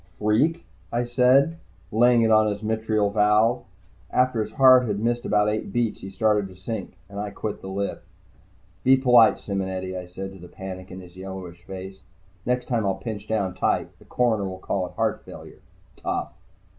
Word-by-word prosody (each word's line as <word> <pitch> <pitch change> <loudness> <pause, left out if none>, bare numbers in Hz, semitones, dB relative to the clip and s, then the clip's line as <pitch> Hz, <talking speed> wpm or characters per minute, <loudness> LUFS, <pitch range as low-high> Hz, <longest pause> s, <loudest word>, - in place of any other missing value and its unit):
"Freak?" 140 +11 +1 0.3
I 120 +1 0
said, 130 +6 +3 0.3
laying 120 +1 +4
it 110 - +3
on 110 0 +5
his 105 0 -3
mitral 110 -1 0
valve. 105 +2 +3 0.4
After 125 -3 +2
his 110 0 -5
heart 130 -2 +6
had 105 -2 -1
missed 120 +3 -1
about 105 0 +2
eight 105 -1 -2
beats, 120 -1 -1
he 95 - -7
started 105 0 +1
to 95 - -14
sink, 95 +2 -6
and 100 0 -8
I 105 0 -3
quit 105 +1 -5
the - - -8
lift. 100 +1 -3 0.8
"Be 130 +1 +6
polite, 125 -4 +6
Simonetti," 95 -2 -4
I 90 -1 -6
said 95 +2 -7
to 95 - -13
the 90 - -11
panic 95 0 -8
in 95 - -8
his 90 -1 -14
yellowish 95 -2 -8
face. 95 +1 -8 0.5
"Next 125 0 0
time 120 -3 0
I'll 95 -1 0
pinch 110 -3 -6
down 100 -4 -1
tight. 95 - 0
The - - -18
coroner 115 -5 +1
will 95 -1 -5
call 95 0 -2
it - - -14
heart - - -1
failure. - - -12 0.4
Tough." - - -3
105 Hz, 185 wpm, -24 LUFS, 95-120 Hz, 0.8 s, heart